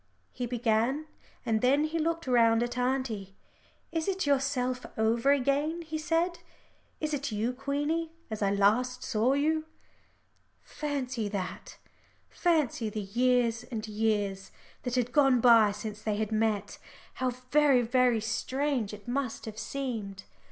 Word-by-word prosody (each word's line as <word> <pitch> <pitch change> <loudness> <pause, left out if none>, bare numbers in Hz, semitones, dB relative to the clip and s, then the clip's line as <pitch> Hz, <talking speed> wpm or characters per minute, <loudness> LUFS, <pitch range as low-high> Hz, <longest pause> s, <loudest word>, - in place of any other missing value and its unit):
he 250 -1 -4
began, 240 +4 +1 0.4
and 220 -2 +1
then 275 +4 +4
he 315 +2 -1
looked 330 +1 -1
round 230 -2 +4
at 240 0 -3
auntie. 250 -6 -2 0.6
"It 325 -1 -2
is 385 -2 0
yourself 265 -3 0
over 230 +4 +3
again," 285 +5 +1
he 315 -1 -4
said, 335 +2 0 0.6
"it 310 -1 -2
is 285 -2 -2
you, 220 +4 -1
Queenie 290 +5 -2 0.2
as 215 - -4
I 200 - +3
last 220 +6 +2
saw 225 +5 +1
you." 310 +2 +1 1.0
Fancy 260 -7 -3
that; 195 -3 -5 0.5
fancy 300 -10 +1
the 215 - -4
years 240 +2 +1
and 225 -3 -5
years 210 -3 -1 0.3
that 245 -1 -3
had 245 -1 0
gone 270 -2 +4
by 230 -3 +6
since 210 +1 -6
they 215 -1 -1
had 215 +1 -2
met! 215 -2 0 0.4
How 255 - +2
very, 255 +1 +3
very 245 -1 +3
strange 240 0 -1
it 210 +3 -17
must 255 -1 -2
have 220 -1 -7
seemed. 225 -9 -4
250 Hz, 140 wpm, -29 LUFS, 220-280 Hz, 1.0 s, by